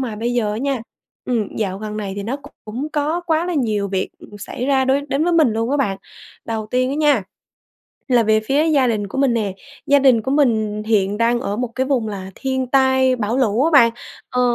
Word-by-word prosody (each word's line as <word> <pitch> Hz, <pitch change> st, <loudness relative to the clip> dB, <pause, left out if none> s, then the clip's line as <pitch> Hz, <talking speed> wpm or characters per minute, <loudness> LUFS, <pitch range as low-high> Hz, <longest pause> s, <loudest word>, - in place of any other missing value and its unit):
mà 235 Hz, -5 st, -3 dB
bây 235 Hz, +3 st, -2 dB
giờ 215 Hz, -4 st, 0 dB
á 210 Hz, -, -3 dB
nha, 275 Hz, -1 st, -1 dB, 0.4 s
ừm, 230 Hz, -5 st, -2 dB
dạo 195 Hz, -3 st, -2 dB
gần 215 Hz, 0 st, -6 dB
này 200 Hz, -2 st, -4 dB
thì 200 Hz, -, -3 dB
nó 235 Hz, +7 st, -3 dB, 0.3 s
cũng 245 Hz, +8 st, -5 dB
có 305 Hz, +3 st, 0 dB
quá 325 Hz, +1 st, +1 dB
là 360 Hz, -, -2 dB
nhiều 215 Hz, -8 st, 0 dB
việc, 190 Hz, -1 st, -1 dB
ừ, -, -, -13 dB
xảy 235 Hz, +5 st, -5 dB
ra 270 Hz, -1 st, +3 dB
đối 265 Hz, +2 st, +2 dB
đến 275 Hz, +3 st, 0 dB
với 350 Hz, -, +1 dB
mình 310 Hz, -8 st, +4 dB
luôn 225 Hz, +2 st, -1 dB
á 285 Hz, -, +2 dB
bạn. 200 Hz, -9 st, -1 dB, 0.5 s
Đầu 220 Hz, -2 st, -3 dB
tiên 255 Hz, +1 st, +1 dB
á -, -, -2 dB
nha 295 Hz, -7 st, +3 dB, 0.9 s
là 240 Hz, -2 st, +5 dB
về 215 Hz, 0 st, +3 dB
phía 275 Hz, +8 st, +1 dB
gia 285 Hz, -5 st, +3 dB
đình 215 Hz, -4 st, -1 dB
của 230 Hz, -, -5 dB
mình 270 Hz, -3 st, +3 dB
nè, 210 Hz, -4 st, -1 dB, 0.3 s
gia 285 Hz, -, +5 dB
đình 255 Hz, -5 st, +4 dB
của 265 Hz, -, -3 dB
mình, 225 Hz, -7 st, +2 dB
ừ, -, -, -10 dB
hiện 200 Hz, -2 st, +2 dB
đang 235 Hz, +1 st, +2 dB
ở 205 Hz, -5 st, -3 dB
một 250 Hz, +2 st, -2 dB
cái 260 Hz, 0 st, 0 dB
vùng 255 Hz, -5 st, 0 dB
là 190 Hz, -2 st, -6 dB
thiên 260 Hz, -1 st, -2 dB
tai 260 Hz, 0 st, +3 dB
bão 230 Hz, 0 st, -1 dB
lũ 240 Hz, 0 st, +2 dB
á 325 Hz, -, +2 dB
bạn, 240 Hz, -6 st, +7 dB, 0.4 s
ờ, 250 Hz, -, 0 dB
245 Hz, 240 wpm, -20 LUFS, 215-275 Hz, 0.9 s, bạn